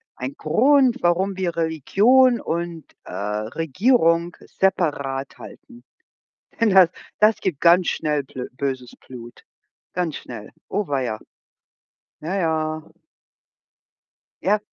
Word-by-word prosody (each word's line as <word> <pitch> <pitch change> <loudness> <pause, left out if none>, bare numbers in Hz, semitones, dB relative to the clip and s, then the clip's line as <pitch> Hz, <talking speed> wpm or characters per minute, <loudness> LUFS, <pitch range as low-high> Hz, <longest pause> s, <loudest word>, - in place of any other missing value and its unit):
ein 130 +2 -6
Grund, 255 - +3
warum 185 +3 +1
wir 175 -3 -2
Religion 215 - +3
und, 170 -1 -4 0.2
äh, - - -11
Regierung 165 - 0
separat 140 -8 -1
halten. 245 -1 -13 0.8
Denn 225 -2 +4
das 185 -3 +6 0.3
das 215 +1 +5
gibt 175 -8 -2
ganz 175 +1 +5
schnell 150 -3 -1
blö 130 -1 -7
böses 130 -3 -4
Blut, 120 -2 -12 0.5
ganz 170 -4 -2
schnell. 115 -4 -9 0.2
Oh 200 -3 -2
weia. 125 -6 -2 1.0
Ja, 170 +6 -3
ja. 155 -3 -1 1.6
Ja, 205 +3 +2
165 Hz, 105 wpm, -22 LUFS, 140-195 Hz, 1.6 s, das